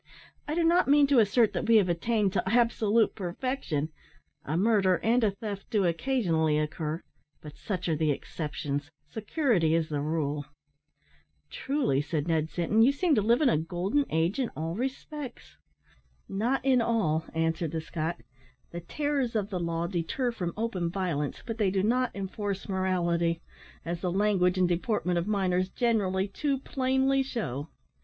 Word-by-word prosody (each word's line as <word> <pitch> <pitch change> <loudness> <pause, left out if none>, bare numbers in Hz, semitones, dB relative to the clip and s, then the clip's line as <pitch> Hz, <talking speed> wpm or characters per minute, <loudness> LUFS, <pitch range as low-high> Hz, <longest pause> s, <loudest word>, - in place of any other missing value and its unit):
I 300 - -2
do 340 - +2
not 345 +2 +4
mean 290 +1 +6
to 275 -3 +4
assert 220 +1 +3
that - - -2
we 230 - +5
have 205 -4 +5
attained 200 +3 +1
to 180 - +2
absolute 230 -2 +3
perfection 180 - -3 0.5
a 155 +4 -2
murder 195 -2 +3
and 235 +2 +3
a 215 - +4
theft 200 0 -6
do 210 -5 +2
occasionally 165 - +1
occur, 155 +2 -3 0.4
but 150 -1 -11
such 180 -1 -4
are 160 - +1
the 155 0 +1
exceptions, 145 -1 -3 0.2
security 215 - +1
is 165 -1 0
the 145 -2 -2
rule." 150 -1 -2 1.1
"Truly," 265 - 0
said 150 +1 -2
Ned 160 -2 +1
Sinton, 175 +8 +1
"you 245 +4 +6
seem 315 +4 +1
to 220 - +3
live 235 +6 +3
in 275 - +5
a 155 - +2
golden 185 - 0
age 165 - 0
in 255 - 0
all 160 +2 -2
respects." 265 - -6 0.7
"Not 240 +7 -1
in 260 -3 +4
all," 190 -10 +1
answered 165 0 0
the 160 - -3
Scot; 160 +1 -4 0.5
"the 170 - -5
terrors 275 - -1
of 210 -1 -1
the 185 - -2
law 170 0 -1
deter 180 +8 -1
from 180 -7 -3
open 200 -7 -1
violence, 170 -6 -2
but 225 -1 -5
they 205 -3 +3
do 190 0 0
not 250 +3 +2
enforce 200 0 -4
morality, 175 -3 0 0.5
as 170 0 -3
the 180 - -1
language 190 -2 +2
and 185 -1 +3
deportment 180 0 0
of 170 - -3
miners 185 -3 +1
generally 200 -5 +1
too 275 +8 -1
plainly 265 0 +1
shew. 165 - -3
190 Hz, 165 wpm, -28 LUFS, 165-235 Hz, 1.1 s, mean